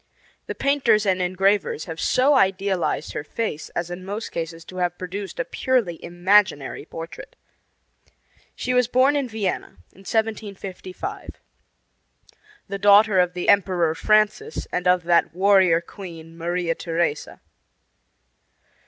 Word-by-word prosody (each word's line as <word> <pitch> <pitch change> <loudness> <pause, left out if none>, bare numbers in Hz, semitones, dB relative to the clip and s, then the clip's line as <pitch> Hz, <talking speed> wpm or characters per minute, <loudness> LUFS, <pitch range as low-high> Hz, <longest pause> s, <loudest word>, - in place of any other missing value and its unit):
The - - -4
painters 255 -7 +2
and 185 -2 +1
engravers 185 -1 +1
have 165 -1 -7
so 265 +3 +3
idealized 195 - +1
her - - -4
face 155 -2 -4
as 175 0 -3
in 175 +1 -6
most 205 +4 -5
cases 165 0 -5
to 185 - -10
have 175 -1 -1
produced 195 - -6
a - - 0
purely 240 - -1
imaginary 175 -5 +1
portrait. 165 0 -9 1.2
She 250 - -2
was 250 -1 +3
born 260 +4 +3
in 275 -3 -1
Vienna, 215 -4 -3
in 195 - -18
1755, 215 - -4 1.3
the 200 0 -5
daughter 205 0 +6
of 180 0 +2
the 180 -1 -4
Emperor 180 -5 +3
Francis 215 - +1
and 180 0 -1
of 180 0 +3
that 170 0 +2
warrior 190 -3 +4
queen, 165 -3 -11
Maria 170 0 -1
Theresa. 165 -2 -2
190 Hz, 125 wpm, -23 LUFS, 175-215 Hz, 1.3 s, daughter